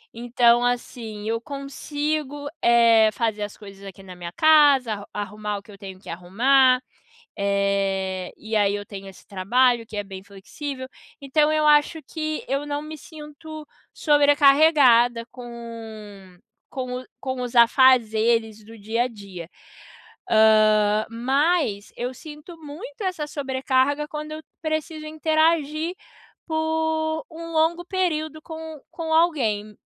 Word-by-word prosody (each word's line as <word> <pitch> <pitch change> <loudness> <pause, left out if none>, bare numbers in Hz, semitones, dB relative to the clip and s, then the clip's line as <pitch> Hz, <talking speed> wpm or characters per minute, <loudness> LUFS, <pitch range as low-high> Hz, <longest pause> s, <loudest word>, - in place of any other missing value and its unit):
Então 240 0 +3
assim, 230 -3 -3
eu 230 +1 -1
consigo, 290 +1 -4
eh, 230 -2 +5
fazer 220 -2 -2
as 205 0 -5
coisas 200 -1 -13
aqui 195 0 -11
na 185 -1 -11
minha 175 -1 -7
casa, 290 - +5
arru 205 -1 -8
arrumar 210 0 -4
o - - -9
que 210 - -16
eu 200 - -13
tenho 190 -2 -10
que - - -20
arrumar, 255 +10 +3 0.6
eh, 195 -2 -1
e 220 +1 -6
aí 205 -1 +2
eu 205 - -4
tenho 195 -1 -9
esse 190 - -15
trabalho, 235 +5 +1
que 215 - -9
é 205 - -2
bem 190 -1 -9
flexível. 260 +8 -8 0.3
Então 295 +2 +2
eu 310 0 +1
acho 300 +2 +4
que 310 0 -4
eu 275 +2 -2
não 290 0 -3
me 310 +1 -8
sinto 310 0 -11 0.3
sobrecarregada 285 -5 +4
com 225 -6 -10 0.3
com 255 -1 -4
o - - -12
com 260 -1 -4
os 245 0 -5
afazeres 230 -3 +4
do 225 +2 -14
dia 225 +4 -1
a - - -2
dia. 195 -7 -10 0.8
Hã, 215 -1 +4
mas 260 - 0
eu 245 +1 -3
sinto 305 +5 -11
muito 330 +12 -10
essa 360 -6 -2
sobrecarga 270 0 0
quando 305 0 -6
eu 310 0 -7 0.2
preciso 310 0 -3
interagir 315 +1 0 0.5
por 315 0 -1
um 330 +1 -8
longo 325 +2 +1
período 315 -5 -2
com 320 -1 -8
com 320 -1 -3
alguém. 230 -11 +1
255 Hz, 135 wpm, -23 LUFS, 215-305 Hz, 0.8 s, eh